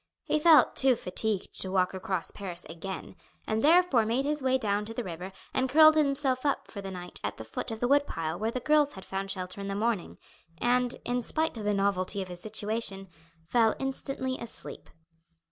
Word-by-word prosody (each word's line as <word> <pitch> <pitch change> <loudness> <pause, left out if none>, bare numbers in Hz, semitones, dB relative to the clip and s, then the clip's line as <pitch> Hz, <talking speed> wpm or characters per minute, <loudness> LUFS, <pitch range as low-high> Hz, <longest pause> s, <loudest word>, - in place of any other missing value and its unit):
He 305 - +1
felt 305 -5 +6
too 265 -2 +5
fatigued 205 0 -2
to 190 - 0
walk 185 -1 +1
across 190 -2 -1
Paris 180 -3 -7
again, 175 +4 -7 0.3
and 220 0 -1
therefore 320 -6 +5
made 235 +5 0
his 295 0 -1
way 260 0 +2
down 210 -4 0
to 225 +1 -7
the 245 - -2
river 180 0 -7 0.2
and 260 0 +1
curled 310 +2 +8
himself 275 -3 +1
up 285 -1 -1
for 200 - -6
the 195 - -6
night 180 -1 -8
at - - -3
the - - -7
foot 110 - -4
of 225 -1 -5
the 245 - +1
wood 285 +2 +3
pile 165 +1 -4
where 220 +2 0
the 255 - -3
girls 300 +1 +3
had 190 - -10
found 195 0 -4
shelter 185 0 -4
in 200 - -5
the 195 - -3
morning, 215 -3 -1 0.4
and, 245 +4 +1
in 245 0 0
spite 315 +6 -1
of 215 -2 -6
the 210 0 +1
novelty 195 0 0
of 190 -1 -4
his 175 -1 -8
situation, 210 -1 -3 0.4
fell 225 +5 +3
instantly 270 -1 -2
asleep. 235 - -6
220 Hz, 205 wpm, -29 LUFS, 190-260 Hz, 0.4 s, curled